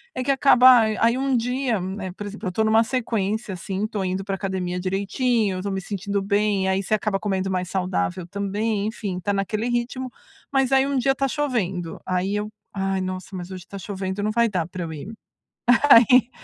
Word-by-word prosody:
é 255 - -2
que 275 - +1
acaba 255 -2 +7 0.2
aí 235 +2 +3
um 270 0 +1
dia, 245 -1 0
né, 190 +1 -5
por 195 +3 -8
exemplo, 205 -1 -6
eu - - +1
estou 220 +5 0
em - - +2
uma 220 +1 +5
sequência, 220 -4 -2
assim, 190 +2 -4
estou 215 -3 -3
indo 185 +1 -2
para 195 0 -3
academia 185 -2 -3
direitinho, 200 +3 0
eu - - -4
estou 200 +2 -3
me 190 0 -2
sentindo 200 +1 -3
bem, 200 -1 +1
aí 190 0 +1
você 205 - -2
acaba 210 -2 -1
comendo 195 -2 -1
mais 180 -1 -2
saudável 185 -1 -1
também, 200 +2 -1
enfim, 205 -4 -4
tá 205 +3 -1
naquele 210 +3 -1
ritmo, 245 +2 -2 0.4
mas 270 -1 +2
aí 270 0 +4
um 280 -1 0
dia 260 +2 +3
está 275 0 0
chovendo, 215 - -2
aí 185 +2 -1
eu: 210 +1 -2 0.2
"Ai, 195 -1 -1
nossa, 185 +1 -5
mas 180 +1 -6
hoje 185 -2 -8
tá 200 - -8
chovendo, 190 0 -4
não 215 - 0
vai 235 0 +2
dar 175 -4 -1
para 180 0 -6
eu 160 -1 -5
ir." 155 +7 -7 0.8
Aí 245 +1 +7
200 Hz, 210 wpm, -23 LUFS, 190-235 Hz, 0.8 s, acaba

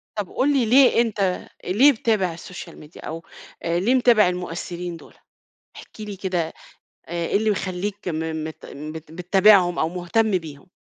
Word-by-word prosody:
طب 210 -4 -3
قُل 290 +2 +1
لي 265 -4 +2
ليه 250 +1 +5
أنت 200 -5 -1 0.2
ليه 235 +11 +5
بتتابع 215 -7 0
السوشيال 170 0 -10
ميديا 150 +2 -13
أو 165 +1 -6 0.4
آآ 170 +1 0
ليه 230 +8 +2
متابع 240 -5 +5
المؤثرين 175 -1 -5
دول؟ - - -16 0.6
احكِ - - -12
لي 210 -1 -6
كده 180 -4 -2 0.5
آآ - - -14 0.2
إيه - - +2
اللي 220 +1 0
مخلّيك 195 +1 -4
م 160 -1 -2
مت 160 0 -8
بت 155 +2 -9
بتتابعهم 180 +1 +4
أو 160 - +1
مُهتم 185 +4 +1
بيهم. 155 -2 -10
180 Hz, 160 wpm, -23 LUFS, 165-215 Hz, 0.6 s, ليه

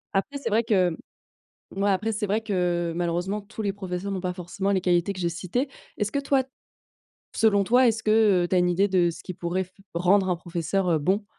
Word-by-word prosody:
Après 280 +9 -1
c'est 280 - -3
vrai 225 +3 +2
que, 190 -6 +3
mmh, - - -6 0.8
moi 200 +1 +2
après 210 +4 0
c'est 210 0 -2
vrai 210 +3 0
que, 175 -5 -1
malheureusement 175 +4 -1
tous 215 +2 -8
les 200 -2 -1
professeurs 190 0 -4
n'ont 190 -2 -3
pas 180 -1 -2
forcément 190 +2 -3
les 190 -2 +1
qualités 175 +1 +2
que 185 - -9
j'ai 170 - 0
citées. 185 - -2 0.3
Est-ce 210 0 -1
que 280 - 0
toi 275 -1 +2 0.9
selon 205 -3 +3
toi, 250 +6 +4
est-ce 225 -1 +1
que, 215 -4 +4
heu, - - -2
tu 185 - +1
as - - +5
une 180 0 +3
idée 195 +4 +2
de 180 -2 +3
ce - - -10
qui 185 - -7
pourrait 175 +3 -2
f 185 - -24 0.2
rendre 185 +2 +3
un 180 - +2
professeur, 175 +2 -2
heu, 160 - +3
bon? 195 +8 0
190 Hz, 230 wpm, -25 LUFS, 180-210 Hz, 0.9 s, as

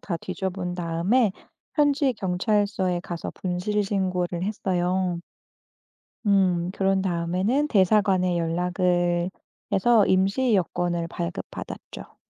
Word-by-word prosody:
다 175 - -3
뒤져본 185 -2 -4
다음에 180 +7 +1 0.4
현지 285 -2 +3
경찰서에 190 -2 0
가서 175 -1 -5
분실 190 +3 -1
신고를 185 -3 -1
했어요. 185 -3 -1 1.1
음. 185 -3 +3
그런 195 -1 +1
다음에는 190 - 0
대사관에 190 -3 +3
연락을 175 +1 +1 0.4
해서 220 +2 +4
임시 195 +6 +2
여권을 175 -2 0
발급 170 0 -4
받았죠. - - -9
185 Hz, 240 characters per minute, -25 LUFS, 175-200 Hz, 1.1 s, 해서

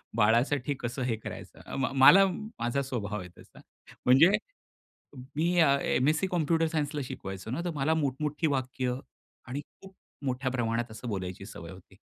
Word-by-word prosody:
बाळासाठी 120 +6 +2
कसं 120 +2 -4
हे 120 -3 0
करायचं. - - -9
अं, 135 -1 -2
मला 195 +9 +9
माझा 155 - -3
स्वभाव 105 -6 -3
आहे 90 -1 -8
तसा. - - -16 0.5
म्हणजे 140 +9 +7 1.1
मी 170 +3 +2
एम-एस-सी 140 +3 +2
कॉम्प्युटर 165 -2 +1
सायन्स 150 -2 -2
ला 145 - -1
शिकवायचो 95 -1 -7
ना 140 - -2
तर - - 0
मला 145 +3 +1
मोठमोठी 150 +1 -1
वाक्य 130 -2 -1 0.5
आणि 135 +4 -4 0.2
खूप 195 0 -13 0.3
मोठ्या 130 0 -1
प्रमाणात 120 -2 -1
असं 115 +2 -7
बोलायची 95 -1 -4
सवय 85 -5 -9
होती. 95 +1 -15
130 Hz, 150 wpm, -29 LUFS, 115-150 Hz, 1.1 s, मला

